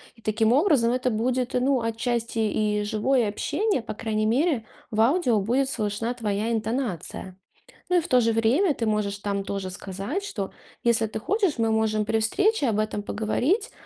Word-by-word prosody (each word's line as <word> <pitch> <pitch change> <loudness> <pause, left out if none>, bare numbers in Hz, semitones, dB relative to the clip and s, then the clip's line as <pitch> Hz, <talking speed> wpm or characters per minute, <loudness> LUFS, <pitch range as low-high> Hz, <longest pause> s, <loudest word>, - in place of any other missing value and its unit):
И 225 - -21
таким 220 +1 +2
образом 275 -6 +3
это 255 0 0
будет, 250 +3 -1
ну, 255 0 +2
отчасти 230 0 -2
и 210 -1 +1
живое 225 +3 +1
общение. 395 - -1
По 225 - -6
крайней 215 0 -1
мере, 255 +1 +1 0.3
в 220 - +1
аудио 250 - +3
будет 260 +6 +1
слышна 220 0 -2
твоя 215 -1 -2
интонация. 220 - -3 0.5
Ну 360 - +4
и - - +4
в 330 - -8
то 250 - +5
же 230 -1 +2
время 265 - +3
ты 230 - -2
можешь 210 -2 0
там 200 -1 -2
тоже 195 -2 -3
сказать, 200 - -4
что 200 - -4 0.3
если 230 -2 +3
ты 220 0 -5
хочешь, 390 - 0
мы 225 -1 +1
можем 220 -1 +1
при 220 +1 0
встрече 385 - +2
об 215 -2 +1
этом 215 -1 -1
поговорить. 270 - 0
225 Hz, 180 wpm, -25 LUFS, 215-255 Hz, 0.5 s, то